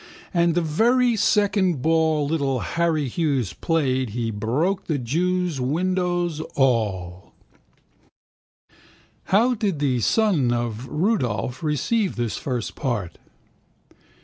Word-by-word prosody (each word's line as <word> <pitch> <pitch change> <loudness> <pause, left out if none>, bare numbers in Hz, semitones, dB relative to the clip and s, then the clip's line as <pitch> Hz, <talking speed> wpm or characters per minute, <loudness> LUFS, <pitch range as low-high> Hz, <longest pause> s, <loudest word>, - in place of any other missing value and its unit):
And 170 -1 +2
the 175 - +2
very 235 +10 +2
second 195 - +2
ball 160 -2 +2
little 140 -4 -1
Harry 165 -4 0
Hughes 135 - -1
played 130 -6 0
He 115 +1 -3
broke 145 - -1
the 155 - 0
jew's 170 +4 -1
windows 175 +3 0 0.2
all. 100 -9 0 1.9
How 230 +6 +3
did 205 -7 -1
the 135 -4 0
son 170 - +2
of 120 0 -3
Rudolph 145 - -1
receive 170 - 0
this 120 -2 -2
first 125 -5 -3
part? 115 - -3
150 Hz, 105 wpm, -23 LUFS, 125-180 Hz, 1.9 s, How